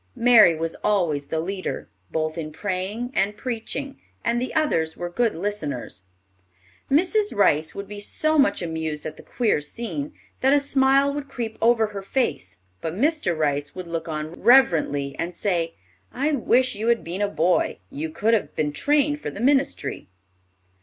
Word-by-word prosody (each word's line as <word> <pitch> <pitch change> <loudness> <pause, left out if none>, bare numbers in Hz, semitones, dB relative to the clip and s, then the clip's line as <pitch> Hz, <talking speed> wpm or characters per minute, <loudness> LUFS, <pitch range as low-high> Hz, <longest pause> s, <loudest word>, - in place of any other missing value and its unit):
Mary 230 -8 +6
was 165 +1 -3
always 165 -9 +1
the 160 - -2
leader, 185 +3 -4 0.2
both 155 0 -2
in 155 -2 -5
praying 205 +7 -3
and 205 -1 0
preaching, 265 +3 -5 0.2
and 235 0 +1
the 255 - -3
others 165 - +1
were 175 0 -4
good 230 +5 +1
listeners. 160 - -4 0.9
Mrs. 375 - +2
Rice 155 -5 +3
would 200 0 -6
be 205 +1 -7
so 310 +9 0
much 275 - +3
amused 160 -2 -3
at 155 0 -5
the - - -13
queer 225 -11 0
scene, 235 - -5 0.3
that 265 +1 +4
a 290 - +5
smile 275 0 +3
would 285 -1 -5
creep 225 -3 -4
over 230 -1 +4
her 205 -2 -6
face; 195 - -2 0.2
but 160 +1 -3
Mr. 280 - +1
Rice 145 -2 -1
would 185 -1 -6
look 165 -1 -4
on 155 -1 -4
reverently, 160 - +4
and 170 +1 -3
say, 170 -4 -1 0.4
"I 285 +4 0
wish 255 -2 +2
you 215 +2 -3
had 235 -1 +2
been 175 +4 -4
a 205 - +2
boy; 180 -2 +1
you 155 +3 -4
could 215 +8 +1
have 220 - 0
been 150 -1 0
trained 295 - +1
for - - -3
the - - -9
ministry." 275 +3 +1
205 Hz, 170 wpm, -24 LUFS, 160-260 Hz, 0.9 s, Mary